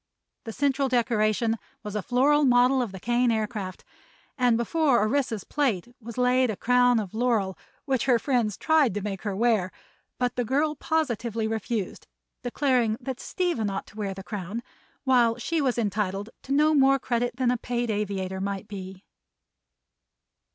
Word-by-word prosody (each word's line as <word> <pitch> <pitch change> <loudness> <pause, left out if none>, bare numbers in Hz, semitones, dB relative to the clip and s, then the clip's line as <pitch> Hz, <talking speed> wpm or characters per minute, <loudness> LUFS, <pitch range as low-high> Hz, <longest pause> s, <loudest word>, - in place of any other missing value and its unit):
The 225 - -5
central 275 +2 +1
decoration 225 -2 +1 0.2
was 210 -2 -6
a 210 - 0
floral 275 +7 +3
model 250 0 +4
of 235 -5 -3
the 190 - -8
Kane 240 +4 +1
Aircraft, 215 -4 -3 0.5
and 245 -3 +3
before 275 +1 +2
Orissa's 225 -1 0
plate 245 -7 -1
was 230 +1 -9
laid 250 0 +3
a 215 - -1
crown 245 +2 +3
of 205 -3 -5
laurel 220 -5 +1 0.3
which 265 -4 0
her 250 -3 +4
friends 230 -5 0
tried 310 - +3
to 205 - -3
make 200 -2 -4
her 205 -3 -3
wear. 215 -4 +2 0.5
But 250 -1 -1
the 245 - +1
girl 285 +6 +1
positively 240 -8 -1
refused, 220 -2 -3 0.3
declaring 245 -3 +1
that 265 0 -5
Stephen 340 - -1
ought 195 0 -4
to - - -18
wear 200 -3 -3
the 195 - -8
crown, 205 +3 -5 0.4
while 245 -4 +3
she 320 +6 -1
was 260 -4 0
entitled 205 -1 -1
to 270 - -9
no 300 +2 +4
more 275 -1 +5
credit 245 -2 -1
than 250 -1 +1
a 250 - 0
paid 240 -1 -2
aviator 190 -2 -2
might 200 0 -3
be. 190 -1 -8
235 Hz, 165 wpm, -26 LUFS, 210-255 Hz, 0.5 s, more